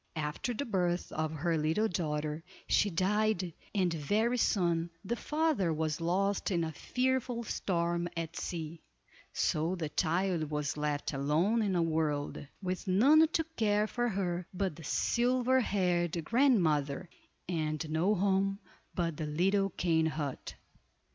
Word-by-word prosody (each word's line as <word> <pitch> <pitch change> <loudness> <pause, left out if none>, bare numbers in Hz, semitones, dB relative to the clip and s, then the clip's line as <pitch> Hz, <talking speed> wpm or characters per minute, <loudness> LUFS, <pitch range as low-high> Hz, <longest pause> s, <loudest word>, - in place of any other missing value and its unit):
After 150 +9 -2
the 280 - -2
birth 180 -5 -1
of 155 0 -2
her 160 +1 0
little 160 +9 +1
daughter, 155 -3 -2 0.2
she 205 - +3
died, 190 0 +1 0.2
and 185 -4 +2
very 215 - +1
soon 170 -6 +1 0.2
the 235 - -1
father 300 - 0
was 155 0 -1
lost 195 +4 +1
in 175 -4 +1
a 160 - -2
fearful 250 - -1
storm 170 -4 -1
at 165 0 -4
sea; 165 -1 -5 0.5
so 160 +4 0
the 160 -4 -3
child 170 0 0
was 150 -1 -2
left 150 0 -2
alone 155 +11 +2
in 200 -3 0
the 175 -2 +2
world, 155 -4 -1 0.2
with 185 +2 -3
none 280 +12 +6
to 325 +1 0
care 210 -1 +2
for 240 +2 -1
her 180 -4 -2
but 190 -3 -1
the 165 - -11
silver 250 - +2
haired 175 -6 0
grandmother, 175 - +2 0.4
and 155 -2 -2
no 165 +7 +2
home 195 +1 +1 0.4
but 170 -4 -1
the 155 - -3
little 195 +6 +2
cane 160 -4 +1
hut. 150 -4 -4
175 Hz, 140 wpm, -31 LUFS, 160-205 Hz, 0.5 s, none